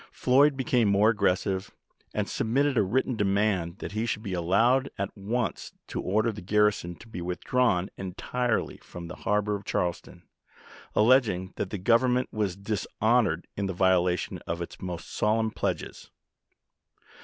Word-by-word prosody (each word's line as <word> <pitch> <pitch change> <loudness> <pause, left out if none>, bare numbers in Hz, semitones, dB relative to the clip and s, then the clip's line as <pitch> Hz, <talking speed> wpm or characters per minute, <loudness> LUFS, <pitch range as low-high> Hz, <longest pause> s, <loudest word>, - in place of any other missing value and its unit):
Floyd 135 +2 +3
became 125 -4 +2
more 100 +2 +4
aggressive, 95 -1 0 0.4
and - - -2
submitted 135 +5 +1
a - - +4
written 125 +6 0
demand 100 -4 +1
that - - -6
he 110 +3 -2
should 110 -1 -2
be 100 -4 -4
allowed 115 +10 +2
at 100 0 -3
once 115 +5 -3
to - - -4
order 110 +4 +1
the 105 - -9
garrison 100 -2 +1
to 110 - -15
be 110 -6 -7
withdrawn 90 +2 +1
entirely 110 +6 -2
from 85 -1 -10
the 90 - -8
harbor 105 0 0
of 100 0 -4
Charleston, 90 -1 -3 0.7
alleging 105 -6 +3
that 95 - -2
the 105 - -4
Govern 120 +6 +3
ment 125 +1 -1
was 105 -4 -1
dishonored 100 -1 0
in 100 -1 -2
the 95 - -3
violation 90 -1 +1
of 85 +1 -2
its 85 - -7
most 90 -2 -5
solemn 110 +1 +1
pledges. - - -4
105 Hz, 155 wpm, -27 LUFS, 95-115 Hz, 0.7 s, more